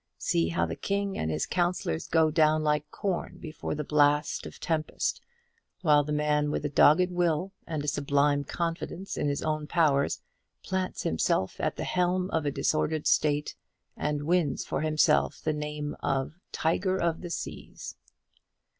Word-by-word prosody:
See 85 Hz, 0 st, +1 dB
how 85 Hz, 0 st, +1 dB
the 80 Hz, 0 st, -4 dB
king 200 Hz, -, -2 dB
and 80 Hz, -, -2 dB
his 80 Hz, -1 st, -1 dB
counsellors 175 Hz, -, -1 dB
go 160 Hz, -1 st, +3 dB
down 155 Hz, -1 st, +3 dB
like 150 Hz, 0 st, 0 dB
corn 190 Hz, 0 st, -3 dB
before 155 Hz, -2 st, -5 dB
the 150 Hz, -, -3 dB
blast 150 Hz, 0 st, +2 dB
of -, -, -10 dB
the -, -, -15 dB
tempest, 160 Hz, -2 st, -1 dB, 0.6 s
while 150 Hz, -3 st, +5 dB
the 150 Hz, -, -5 dB
man 150 Hz, 0 st, +1 dB
with 150 Hz, -, -2 dB
a -, -, 0 dB
dogged 165 Hz, +5 st, +5 dB
will, 175 Hz, +1 st, 0 dB, 0.2 s
and 155 Hz, -3 st, -3 dB
a -, -, -5 dB
sublime 145 Hz, 0 st, +2 dB
confidence 170 Hz, +4 st, -4 dB
in -, -, -1 dB
his 140 Hz, -, -2 dB
own 155 Hz, -1 st, -1 dB
powers, 150 Hz, -5 st, +2 dB, 0.4 s
plants 185 Hz, -1 st, -2 dB
himself 95 Hz, +4 st, 0 dB
at -, -, 0 dB
the -, -, -4 dB
helm 180 Hz, +1 st, 0 dB
of 155 Hz, -2 st, 0 dB
a -, -, +1 dB
disordered 155 Hz, +2 st, 0 dB
state, 150 Hz, -1 st, +2 dB, 0.4 s
and 150 Hz, -1 st, -2 dB
wins 165 Hz, -5 st, +1 dB
for -, -, -2 dB
himself 155 Hz, 0 st, +2 dB
the 155 Hz, -, -1 dB
name 150 Hz, 0 st, -4 dB
of 135 Hz, +1 st, -1 dB, 0.2 s
Tiger 185 Hz, +4 st, 0 dB
of 170 Hz, -3 st, 0 dB
the 175 Hz, -, -6 dB
Seas. -, -, -6 dB
150 Hz, 165 wpm, -28 LUFS, 145-170 Hz, 0.6 s, while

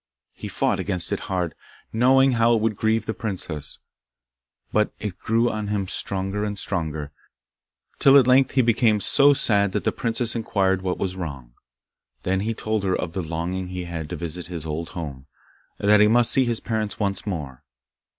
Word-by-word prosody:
He -, -, -8 dB
fought -, -, 0 dB
against 90 Hz, -4 st, -2 dB
it -, -, -1 dB
hard, 90 Hz, -4 st, -1 dB, 0.4 s
knowing 130 Hz, +3 st, +4 dB
how 115 Hz, -1 st, +3 dB
it -, -, +1 dB
would 110 Hz, -1 st, 0 dB
grieve 110 Hz, +1 st, 0 dB
the 110 Hz, -, -2 dB
princess, 90 Hz, -10 st, -5 dB, 1.0 s
but 105 Hz, 0 st, +2 dB
it 105 Hz, -4 st, -5 dB
grew 115 Hz, +2 st, +1 dB
on 110 Hz, -3 st, -3 dB
him 100 Hz, -2 st, -2 dB
stronger 95 Hz, +2 st, -2 dB
and 105 Hz, -1 st, -3 dB
stronger, 80 Hz, -7 st, -3 dB, 0.9 s
till 140 Hz, 0 st, +7 dB
at 135 Hz, -, +6 dB
length 130 Hz, +1 st, +4 dB
he 130 Hz, -, +3 dB
became 115 Hz, -2 st, +3 dB
so 140 Hz, +7 st, +6 dB
sad 100 Hz, -6 st, +2 dB
that -, -, -1 dB
the -, -, +1 dB
princess 115 Hz, 0 st, 0 dB
inquired 95 Hz, -4 st, 0 dB
what 90 Hz, -1 st, -2 dB
was 95 Hz, -1 st, -3 dB
wrong. 70 Hz, -9 st, -7 dB, 0.7 s
Then 95 Hz, +1 st, 0 dB
he 110 Hz, +3 st, -2 dB
told 110 Hz, -1 st, -2 dB
her 95 Hz, -1 st, +1 dB
of 80 Hz, -, -4 dB
the 95 Hz, -, -2 dB
longing 85 Hz, +3 st, -4 dB
he 90 Hz, 0 st, -5 dB
had 80 Hz, -3 st, -6 dB
to -, -, -4 dB
visit 85 Hz, 0 st, -6 dB
his 85 Hz, -3 st, -6 dB
old 80 Hz, +2 st, -4 dB
home, 70 Hz, -5 st, -7 dB, 0.5 s
and 100 Hz, -, -3 dB
that 105 Hz, 0 st, +6 dB
he 105 Hz, -, +6 dB
must 120 Hz, +1 st, +4 dB
see 130 Hz, -, +3 dB
his 120 Hz, -2 st, -1 dB
parents 110 Hz, -2 st, -3 dB
once 100 Hz, -1 st, -2 dB
more. 75 Hz, -10 st, -5 dB
100 Hz, 190 wpm, -23 LUFS, 90-115 Hz, 1.0 s, till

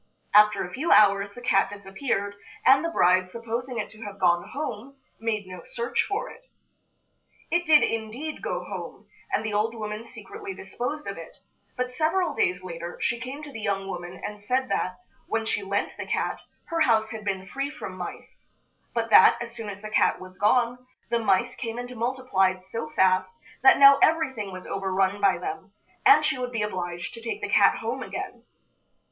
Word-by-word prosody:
After 210 Hz, 0 st, +6 dB
a 180 Hz, -, -8 dB
few 310 Hz, +6 st, -1 dB
hours 200 Hz, -1 st, +5 dB
the 245 Hz, -, -10 dB
cat 195 Hz, -6 st, +3 dB
disappeared, 200 Hz, +1 st, -3 dB, 0.3 s
and 270 Hz, +3 st, +6 dB
the 335 Hz, -, 0 dB
bride, 185 Hz, -, +3 dB
supposing 235 Hz, +4 st, -4 dB
it 210 Hz, -, -2 dB
to 220 Hz, -, -13 dB
have 205 Hz, -2 st, -7 dB
gone 175 Hz, -1 st, +2 dB
home, 275 Hz, -1 st, -6 dB, 0.2 s
made 220 Hz, -2 st, -2 dB
no 185 Hz, -1 st, -9 dB
search 235 Hz, +1 st, -1 dB
for 410 Hz, +3 st, -2 dB
it. -, -, -14 dB, 1.0 s
It 345 Hz, 0 st, +1 dB
did, 305 Hz, -1 st, +7 dB
indeed, 230 Hz, +8 st, -3 dB
go 180 Hz, 0 st, -3 dB
home, 190 Hz, +2 st, -8 dB, 0.2 s
and 215 Hz, -, 0 dB
the 215 Hz, -, -2 dB
old 215 Hz, +3 st, 0 dB
woman 215 Hz, 0 st, -5 dB
secretly 400 Hz, -, -9 dB
disposed 300 Hz, -5 st, -5 dB
of 200 Hz, -4 st, -5 dB
it; 165 Hz, -, -11 dB, 0.4 s
but 250 Hz, 0 st, -1 dB
several 320 Hz, +5 st, +1 dB
days 180 Hz, 0 st, 0 dB
later 170 Hz, -1 st, -6 dB
she 235 Hz, 0 st, 0 dB
came 260 Hz, +5 st, -7 dB
to 295 Hz, -, -8 dB
the 225 Hz, -4 st, -7 dB
young 195 Hz, -2 st, -1 dB
woman 175 Hz, 0 st, -6 dB
and 210 Hz, 0 st, -7 dB
said 260 Hz, +4 st, 0 dB
that, 185 Hz, 0 st, -1 dB, 0.3 s
when 225 Hz, 0 st, -1 dB
she 210 Hz, -, -1 dB
lent 200 Hz, +1 st, -2 dB
the -, -, -6 dB
cat, -, -, -1 dB, 0.3 s
her 335 Hz, -, -1 dB
house 220 Hz, -5 st, +3 dB
had 220 Hz, -2 st, -6 dB
been 190 Hz, -2 st, -2 dB
free 275 Hz, +8 st, -3 dB
from 295 Hz, -11 st, -8 dB
mice, 180 Hz, -1 st, -9 dB, 0.5 s
but 230 Hz, -1 st, -1 dB
that, 190 Hz, -, +8 dB
as 235 Hz, 0 st, -6 dB
soon 225 Hz, -3 st, -5 dB
as 200 Hz, +1 st, -8 dB
the 215 Hz, -, -6 dB
cat -, -, +3 dB
was 185 Hz, 0 st, -12 dB
gone, 245 Hz, +3 st, +2 dB, 0.3 s
the 235 Hz, -, +2 dB
mice 215 Hz, +2 st, +2 dB
came 230 Hz, -2 st, -5 dB
and 245 Hz, 0 st, -6 dB
multiplied 225 Hz, -7 st, 0 dB
so 190 Hz, -3 st, -5 dB
fast 185 Hz, 0 st, +3 dB, 0.3 s
that 265 Hz, -, +7 dB
now 275 Hz, 0 st, +8 dB
everything 265 Hz, -11 st, +2 dB
was 185 Hz, 0 st, -8 dB
overrun 195 Hz, +1 st, 0 dB
by 195 Hz, -3 st, +4 dB
them, 180 Hz, -, -6 dB, 0.3 s
and 400 Hz, -7 st, +7 dB
she 300 Hz, -4 st, 0 dB
would 250 Hz, 0 st, -3 dB
be 225 Hz, -3 st, -1 dB
obliged 175 Hz, -4 st, -4 dB
to 230 Hz, -, -8 dB
take 230 Hz, -, -4 dB
the -, -, -3 dB
cat -, -, +5 dB
home -, -, -3 dB
again. -, -, -6 dB
220 Hz, 190 wpm, -26 LUFS, 195-255 Hz, 1.0 s, that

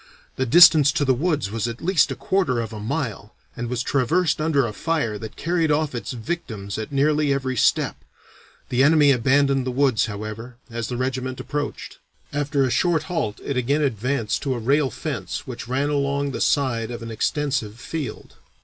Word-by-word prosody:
The 130 Hz, -, -1 dB
distance 155 Hz, 0 st, +8 dB
to 150 Hz, -3 st, +1 dB
the 130 Hz, -, +4 dB
woods 145 Hz, -, -1 dB
was 115 Hz, +1 st, -2 dB
at 115 Hz, 0 st, -5 dB
least 170 Hz, -4 st, +2 dB
a 135 Hz, -, -3 dB
quarter 140 Hz, -1 st, 0 dB
of 115 Hz, -1 st, -4 dB
a 105 Hz, -, -6 dB
mile, 110 Hz, -2 st, -4 dB, 0.2 s
and 120 Hz, -1 st, -4 dB
was 125 Hz, 0 st, -2 dB
traversed 155 Hz, +5 st, +1 dB
under 150 Hz, -4 st, +2 dB
a 110 Hz, -, -4 dB
fire 135 Hz, -8 st, -1 dB
that 110 Hz, 0 st, -8 dB
carried 165 Hz, -1 st, 0 dB
off 150 Hz, -1 st, +1 dB
its 120 Hz, -, -5 dB
victims 110 Hz, -, -5 dB
at 110 Hz, -, -5 dB
nearly 145 Hz, +1 st, +2 dB
every 130 Hz, -2 st, -1 dB
step. -, -, +2 dB, 0.7 s
The 125 Hz, +1 st, +2 dB
enemy 150 Hz, 0 st, +5 dB
abandoned 135 Hz, +2 st, +3 dB
the 130 Hz, -, -3 dB
woods, 130 Hz, -3 st, +2 dB
however, 110 Hz, +3 st, -7 dB, 0.2 s
as 115 Hz, -1 st, -3 dB
the 125 Hz, -, -4 dB
regiment 130 Hz, 0 st, -3 dB
approached. 145 Hz, +2 st, -5 dB, 0.3 s
After 145 Hz, -1 st, 0 dB
a 130 Hz, -, 0 dB
short 170 Hz, 0 st, +2 dB
halt 155 Hz, -, -3 dB
it 140 Hz, -, -2 dB
again 140 Hz, +5 st, +1 dB
advanced 125 Hz, -2 st, -1 dB
to 135 Hz, -3 st, -1 dB
a -, -, -3 dB
rail 135 Hz, +4 st, +2 dB
fence 140 Hz, -, -5 dB
which 125 Hz, -4 st, -7 dB
ran 135 Hz, +3 st, 0 dB
along 140 Hz, -1 st, 0 dB
the -, -, -4 dB
side 120 Hz, -6 st, +1 dB
of 120 Hz, -1 st, -6 dB
an 115 Hz, -, -6 dB
extensive 130 Hz, -2 st, -1 dB
field. 140 Hz, -5 st, -6 dB
135 Hz, 185 wpm, -23 LUFS, 115-145 Hz, 0.7 s, distance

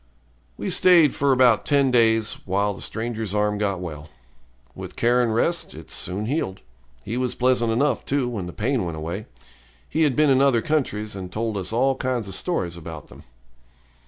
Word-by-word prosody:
We -, -, -3 dB
stayed 170 Hz, -6 st, +5 dB
for 140 Hz, -1 st, +1 dB
about 125 Hz, -4 st, +4 dB
ten 140 Hz, -3 st, +2 dB
days, 115 Hz, -2 st, +3 dB
while 100 Hz, +2 st, 0 dB
the 100 Hz, -, -11 dB
stranger's 110 Hz, -2 st, -3 dB
arm 105 Hz, 0 st, +1 dB
got 100 Hz, -3 st, -1 dB
well. 80 Hz, -4 st, -7 dB, 0.6 s
With -, -, -9 dB
care 120 Hz, +1 st, +3 dB
and 120 Hz, -2 st, +1 dB
rest, 165 Hz, +10 st, 0 dB
it -, -, -11 dB
soon 95 Hz, +4 st, -3 dB
healed. 110 Hz, -8 st, -2 dB, 0.4 s
He 115 Hz, +4 st, -4 dB
was 125 Hz, -1 st, -1 dB
pleasant 125 Hz, -2 st, +2 dB
enough, 140 Hz, +6 st, +1 dB
too, 135 Hz, -2 st, 0 dB
when 105 Hz, -7 st, -4 dB
the -, -, -6 dB
pain 120 Hz, +5 st, -1 dB
went 85 Hz, -3 st, -4 dB
away. 85 Hz, +7 st, -5 dB, 0.6 s
He 160 Hz, -, -1 dB
had 145 Hz, -5 st, +3 dB
been 150 Hz, -2 st, +4 dB
in 130 Hz, 0 st, +4 dB
other 135 Hz, -5 st, +3 dB
countries, 110 Hz, -9 st, -1 dB
and 90 Hz, -2 st, -7 dB
told 110 Hz, +1 st, -2 dB
us 95 Hz, 0 st, -3 dB
all 130 Hz, +4 st, +2 dB
kinds 125 Hz, -5 st, -2 dB
of 95 Hz, -, -5 dB
stories 90 Hz, -, -1 dB
about 80 Hz, -2 st, -9 dB
them. -, -, -15 dB
115 Hz, 190 wpm, -23 LUFS, 100-130 Hz, 0.6 s, stayed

